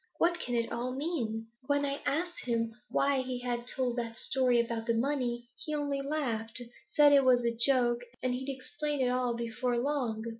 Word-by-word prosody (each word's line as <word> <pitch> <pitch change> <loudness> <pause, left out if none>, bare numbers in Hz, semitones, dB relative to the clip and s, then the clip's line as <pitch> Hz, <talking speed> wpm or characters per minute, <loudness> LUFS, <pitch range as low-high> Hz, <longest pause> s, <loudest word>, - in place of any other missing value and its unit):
'What 345 0 +2
can 245 -5 -2
it 230 -1 0
all 245 +2 -2
mean? 235 -8 -2 0.2
When 285 0 +2
I 280 0 -2
asked 350 +5 -1
him 230 -2 0 0.2
why 275 -1 +2
he 255 -1 -3
had 240 -1 -3
told 250 -1 -1
that 230 -1 -3
story 255 -1 +3
about 230 -1 -1
the 230 - +2
money, 240 -1 -1 0.2
he 305 - -2
only 285 -2 -1
laughed 250 -6 -2 0.4
said 295 -1 +7
it 280 -1 +7
was 250 -1 +5
a 235 0 +1
joke, 240 0 +3 0.2
and 255 -1 +1
he'd 260 +2 -3
explain 290 +2 -3
it 250 - +3
all 250 -1 +1
before 235 +1 -1
long. 240 -4 -1
250 Hz, 190 wpm, -31 LUFS, 235-280 Hz, 0.4 s, said